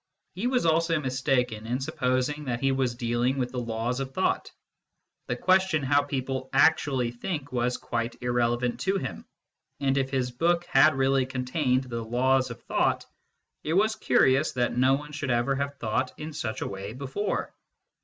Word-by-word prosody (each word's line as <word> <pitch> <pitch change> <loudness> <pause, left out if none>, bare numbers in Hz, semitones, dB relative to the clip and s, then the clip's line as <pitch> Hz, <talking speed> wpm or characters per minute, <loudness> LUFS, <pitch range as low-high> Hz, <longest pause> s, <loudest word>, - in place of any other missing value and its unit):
He 195 +7 -2
was 250 -6 +1
also 165 0 +2
mistaken 130 -5 -1
in 125 +2 -1
supposing 130 +3 -1
that 120 -2 -2
he 135 +1 +2
was 130 -3 0
dealing 120 +2 0
with 125 -2 -1
the 125 - -3
laws 115 +2 -2
of 135 -1 -5
thought: - - 0 0.8
the 125 - -1
question 185 0 +2
how 140 +2 +4
people 130 -2 -3
actually 135 -4 +3
think 145 +2 -5
was 125 0 0
quite 115 0 -3
irrelevant 120 0 0
to 195 +1 +1
him, - - -6 0.5
and 140 -1 +1
if 135 -1 -1
his 130 -2 -1
book 170 +7 +1
had 140 +2 +5
really 135 -1 +2
con 125 -1 -4
tained 130 -1 +1
the 115 -2 -4
laws 130 +3 +2
of - - -9
thought, - - 0 0.6
it 155 - -1
was 215 +4 +3
curious 135 +4 +3
that 120 -1 0
no 130 +2 +4
one 150 +1 -7
should 145 -2 -4
ever 120 +2 +2
have 140 +1 -3
thought 125 0 -1
in 155 +1 -6
such 110 -6 -4
a - - -2
way 100 +2 -6
before. 140 - -3
130 Hz, 175 wpm, -27 LUFS, 125-145 Hz, 0.8 s, had